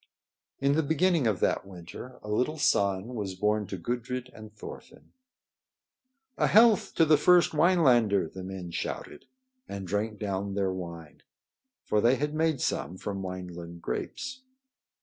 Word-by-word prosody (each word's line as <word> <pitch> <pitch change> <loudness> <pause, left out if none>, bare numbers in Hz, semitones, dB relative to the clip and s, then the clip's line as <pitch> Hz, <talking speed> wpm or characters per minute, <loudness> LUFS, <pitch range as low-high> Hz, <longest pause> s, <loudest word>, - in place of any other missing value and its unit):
In 140 +1 +2
the 160 - +3
beginning 160 -1 +2
of 105 -5 0
that - - +1
winter 95 +6 -10
a - - -9
little 125 +9 0
son 100 -5 +1
was 100 -5 -4
born 105 +1 0
to 95 - -5
Gudrid 125 +6 -4
and 110 -1 -11
Thorfinn. 105 - -12 1.3
"A - - +4
health 220 -2 +5
to 165 - +5
the 155 -1 +5
first 175 +3 +5
Winelander!" 130 - +4
the 95 +4 -9
men 95 -2 -6
shouted - - -5 0.4
and 100 -2 -5
drank 105 +3 -2
down 100 -1 -3
their 95 -2 0
wine; 85 -4 -8 0.6
for 105 - +2
they 120 +4 +4
had 150 +3 -2
made 155 -3 +1
some 75 +7 -2
from 100 0 -4
Wineland 90 -2 -7
grapes. 255 0 -4
105 Hz, 150 wpm, -28 LUFS, 95-145 Hz, 1.3 s, health